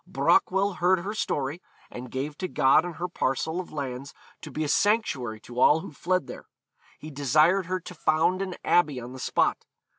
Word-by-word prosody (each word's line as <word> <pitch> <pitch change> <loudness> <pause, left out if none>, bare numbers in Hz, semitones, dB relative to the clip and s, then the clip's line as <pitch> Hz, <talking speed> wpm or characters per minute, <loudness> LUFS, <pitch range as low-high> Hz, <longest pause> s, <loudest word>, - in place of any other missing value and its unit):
Brochwel 195 0 +2
heard 180 0 +3
her 200 +4 -4
story, 145 -5 -2 0.3
and 125 +1 -8
gave 140 +4 -4
to 185 - -2
God 145 +1 +3
and 175 -2 -6
her 175 +3 -4
a - - -2
parcel 160 +1 -2
of 185 - -7
lands 140 -2 -6 0.3
to - - -8
be 155 - -3
a - - -2
sanctuary 140 - +1
to 120 +2 -8
all 150 +5 +5
who 185 - -9
fled 185 +5 -1
there. - - -10 0.5
He 155 - -10
desired 155 +7 +3
her 185 0 -1
to 180 - -10
found 165 +3 +1
an 185 -2 -4
abbey 150 -7 +2
on 125 +1 -9
the 130 - -9
spot. - - 0
155 Hz, 200 wpm, -26 LUFS, 135-185 Hz, 0.5 s, all